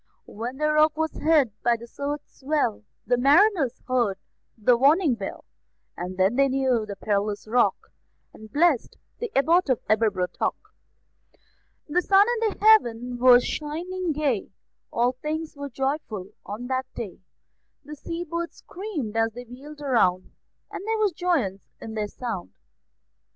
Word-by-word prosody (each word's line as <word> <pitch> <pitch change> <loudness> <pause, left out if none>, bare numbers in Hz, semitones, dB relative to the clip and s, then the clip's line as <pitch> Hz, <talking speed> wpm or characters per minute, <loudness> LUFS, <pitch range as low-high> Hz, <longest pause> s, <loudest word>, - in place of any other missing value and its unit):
When 240 +5 -6
the 305 +1 +1
Rock 305 0 +3
was 320 0 0
hid 300 -7 +3
by 240 -1 +2
the 235 - -10
surge's 285 +4 -6
swell, 270 - 0 0.2
The 245 0 +1
mariners 290 - +3
heard 240 -7 +1 0.4
the 235 +3 +4
warning 285 +4 +4
bell; 200 -4 -6 0.5
And 180 +1 -6
then 190 +6 +2
they 275 0 +5
knew 260 -4 +1
the 200 - -5
perilous 205 +1 -2
Rock, 240 +3 +1 0.4
And 220 0 -13
blessed 305 -4 +2 0.2
the 475 - -4
Abbot 330 +3 +3
of 255 - +2
Aberbrothock. 205 -4 +1 1.3
The 340 +4 +1
sun 395 +2 +5 0.2
in 415 - -4
heaven 245 - +3
was 245 -1 +7
shining 340 +4 -3
gay; 280 -8 -1 0.4
All 240 +2 +2
things 305 +5 -5
were 285 0 -6
joyful 265 -7 -3 0.2
on 215 +4 -5
that 260 +1 -2
day; 210 -7 -6 0.7
The 300 +1 -8
sea 335 +4 -5
birds 340 0 -4
screamed 345 - -6
as 225 0 +1
they 245 +2 -8
wheeled 285 +5 -11
round, 185 -10 +1 0.4
And - - -6
there 445 0 +1
was 425 -2 +2
joyance 295 - -1
in 220 - -8
their 215 -1 -2
sound. 100 - -6
260 Hz, 145 wpm, -25 LUFS, 225-310 Hz, 1.3 s, was